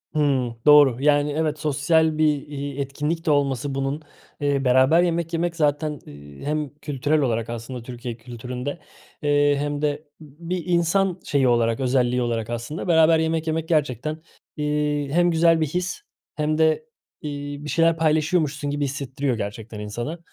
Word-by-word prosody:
Hıı. 135 -6 +1
Doğru. 145 -5 +7
Yani, 145 0 +3
evet, 155 0 -1
sosyal 155 +2 +2
bir, 150 -2 +1
iii, 140 -1 -5
etkinlik 150 +5 -3
de 155 - +3
olması 140 -1 0
bunun, 135 +3 -2 0.4
eee, 140 -1 +1
beraber 130 +7 +5
yemek 170 -1 -1
yemek 170 +1 -1
zaten, 150 -1 0
eee, 70 -1 -12
hem 150 0 -1
kültürel 145 +1 -1
olarak, 115 -3 -1
aslında, 120 +1 -6
Türkiye 120 -1 -7
kültüründe, 125 +5 -6 0.4
eee, 145 -1 +3
hem 145 0 -2
de 150 0 -1 0.2
b 155 +2 -12
bir 180 -2 -1
insan 180 +2 +1
şeyi 135 -3 +1
olarak, 115 -1 +2
özelliği 125 -1 +1
olarak 115 -2 -2
aslında 120 +10 -5
beraber 160 -1 +5
yemek 160 0 -1
yemek 160 0 -1
gerçekten, 155 0 0 0.4
iii, 150 -1 -1
hem 175 +1 +3
güzel 165 0 +4
bir 155 - +2
his 180 +4 -3 0.3
hem 155 0 0
de, 160 +8 +2 0.4
iii, 145 -1 -6
bir - - -5
şeyler 165 0 +3
paylaşıyormuşsun 155 -2 +1
gibi 145 0 -1
hissettiriyor 135 -2 -2
gerçekten 105 +1 -6
insana. 120 +10 -5
145 Hz, 155 wpm, -23 LUFS, 130-160 Hz, 0.4 s, Doğru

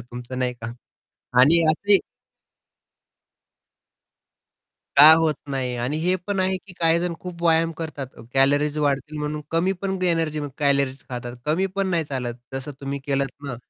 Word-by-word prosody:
तुमचं 125 +1 -8
नाही 125 -1 0
का. 115 -1 -7 0.7
आणि 165 +6 +5
असे 200 +5 +4 3.0
का 150 +3 +10
होत 160 -2 +2
नाही? 130 -2 -2
आणि 125 +5 -2
हे 180 +3 +1
पण 200 -2 -1
आहे, 185 0 +1
की 190 +1 -13
काहीजण 170 +1 +2
खूप 175 -2 -8
व्यायाम 165 0 +3
करतात 155 -4 -5 0.3
कॅलरीज 145 +2 +3
वाढतील 145 +1 -1
म्हणून 150 0 -3
कमी 170 +3 +1
पण 190 -1 -1
एनर्जी 165 -4 0 0.2
कॅलरीज 140 -2 +1
खातात 120 -1 -6
कमी 165 +6 +1
पण 195 - +1
नाही 165 -3 +1
चालत 125 -4 -4 0.2
जसं 135 +2 -5
तुम्ही 140 0 -4
केलत 140 -1 0 0.2
ना 125 -4 -4
150 Hz, 145 wpm, -23 LUFS, 135-170 Hz, 3.0 s, का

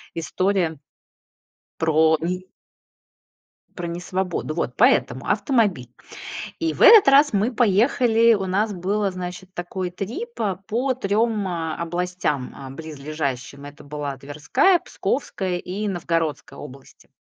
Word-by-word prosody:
история 175 -1 0 1.0
Про 160 0 +4
ни 180 +2 -3 1.3
Про 175 -2 -4
несвободу. 175 -2 -3
Вот - - -2
поэтому - - +3
автомобиль. 205 - +1 0.7
И 160 -1 0
в - - -2
этот 435 -9 +9
раз 285 +2 +6
мы 210 +5 +1
поехали. 230 +1 +4
У 195 -2 -2
нас 205 +3 0
было, 195 +3 -1
значит, 185 0 -7
такой 180 +1 -4
трип, 245 - -6
а, 200 -4 0
по 245 +5 0
3, 215 -2 0
а, 165 -3 -3
областям, 170 -5 -2
а, 135 -1 -9
близлежащим. 140 -2 -5
Это 145 0 -11
была 145 -1 -5
Тверская, 155 - +2
Псковская 190 -5 -2
и 200 +4 -4
Новгородская 165 -7 -2
области. 135 +1 -13
180 Hz, 120 wpm, -23 LUFS, 160-210 Hz, 1.3 s, этот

